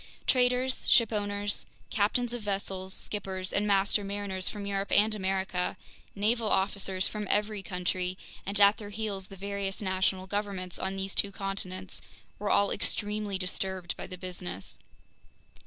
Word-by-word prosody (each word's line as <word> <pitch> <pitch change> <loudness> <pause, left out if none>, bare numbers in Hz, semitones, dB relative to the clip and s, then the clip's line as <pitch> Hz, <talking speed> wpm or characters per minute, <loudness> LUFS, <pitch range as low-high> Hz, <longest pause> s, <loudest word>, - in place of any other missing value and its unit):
Traders, 250 0 +3
shipowners, 205 -3 +2 0.2
captains 235 +4 +2
of 240 - -3
vessels, 195 -2 -2
skippers, 190 -2 -2
and 205 +1 +2
master 200 +1 +3
mariners 200 -2 -2
from 205 -1 -5
Europe 200 0 -1
and 215 +1 +5
America, 190 -2 0 0.4
naval 220 +2 +2
officers 190 -1 +2
from 210 -1 -4
every 210 0 +2
country, 180 0 -1 0.3
and 200 +1 0
at 200 +1 +7
their 205 -2 -7
heels 205 -2 -3
the 195 - -11
various 200 0 -2
national 190 -1 +1
governments 195 -2 -3
on 190 0 -1
these 195 0 -2
two 200 - +2
continents, 190 -1 -3 0.4
were 205 0 -1
all 200 0 +4
extremely 210 -2 -1
disturbed 185 -1 -2
by - - -6
the 185 0 -7
business. 100 - -4
200 Hz, 140 wpm, -30 LUFS, 190-205 Hz, 0.4 s, at